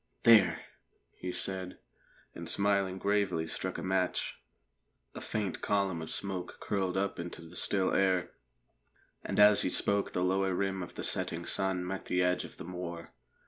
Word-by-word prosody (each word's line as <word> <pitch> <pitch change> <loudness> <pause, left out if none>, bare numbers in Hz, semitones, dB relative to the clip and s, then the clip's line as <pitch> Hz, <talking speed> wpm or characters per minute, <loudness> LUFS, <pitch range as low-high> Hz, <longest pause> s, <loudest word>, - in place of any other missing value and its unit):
"There!" 115 -2 +6 0.5
he 90 - -5
said, 95 0 -1 0.6
and - - -7
smiling 100 -2 +1
gravely 100 -4 +1
struck 95 +3 -4
a - - -5
match. 95 -1 -1 0.7
A - - -7
faint 105 -4 -3
column 100 -4 0
of 80 - -6
smoke 95 -2 -4
curled 95 -2 -1
up 100 -1 -1
into 85 -1 -6
the 85 +2 -13
still 95 +2 0
air, 95 -2 +2 0.9
and - - -2
as 105 0 +7
he - - +1
spoke 100 +2 +1
the 90 - 0
lower 95 0 +1
rim 95 0 -1
of 90 - -8
the - - -5
setting - - 0
sun 95 -2 +1
met 95 +1 -4
the 90 0 +1
edge 90 0 +1
of - - -12
the - - -8
moor. 85 -1 -6
95 Hz, 165 wpm, -31 LUFS, 90-100 Hz, 0.9 s, as